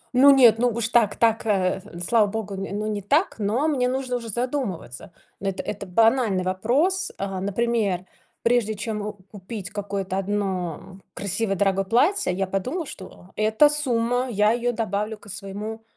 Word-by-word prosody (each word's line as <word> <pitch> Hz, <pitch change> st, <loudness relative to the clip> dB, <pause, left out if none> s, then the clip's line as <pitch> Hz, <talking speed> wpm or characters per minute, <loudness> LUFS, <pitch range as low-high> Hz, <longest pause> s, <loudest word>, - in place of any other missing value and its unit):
Ну 275 Hz, +3 st, +8 dB
нет, 245 Hz, -5 st, +7 dB
ну 245 Hz, 0 st, +3 dB
уж 235 Hz, 0 st, -2 dB
так 230 Hz, -4 st, +3 dB
так, 225 Hz, -1 st, +2 dB
э, 190 Hz, -2 st, +1 dB, 0.3 s
слава 225 Hz, -3 st, +4 dB
Богу, 210 Hz, -1 st, -4 dB
ну, 200 Hz, +2 st, -4 dB
не 210 Hz, -1 st, -2 dB
так, 285 Hz, -, +1 dB
но 225 Hz, +9 st, +1 dB
мне 255 Hz, -5 st, +1 dB
уже 255 Hz, -1 st, -2 dB
задумываться. 225 Hz, -, -4 dB, 0.3 s
Эт 195 Hz, -1 st, -3 dB
это 200 Hz, -2 st, -5 dB
банальный 225 Hz, -1 st, +3 dB
вопрос. 280 Hz, -, +1 dB
Э, 195 Hz, -1 st, -3 dB
например, 200 Hz, -2 st, 0 dB, 0.4 s
прежде 230 Hz, -3 st, +2 dB
чем 210 Hz, 0 st, -4 dB
о 210 Hz, +1 st, -4 dB
купить 195 Hz, +1 st, -9 dB
какое-то 195 Hz, -2 st, -3 dB
одно 190 Hz, -2 st, -3 dB, 0.2 s
красивое 200 Hz, +1 st, -1 dB
дорогое 195 Hz, 0 st, +1 dB
платье, 285 Hz, -, +2 dB
я 195 Hz, +1 st, -1 dB
подумала, 250 Hz, -, -3 dB
что 185 Hz, -4 st, -11 dB
эта 220 Hz, +7 st, +4 dB
сумма, 250 Hz, -4 st, 0 dB
я 210 Hz, 0 st, +3 dB
ее 240 Hz, +1 st, 0 dB
добавлю 215 Hz, -1 st, -2 dB
к 205 Hz, -, -15 dB
своему 205 Hz, +3 st, -6 dB
215 Hz, 155 wpm, -24 LUFS, 195-240 Hz, 0.4 s, Ну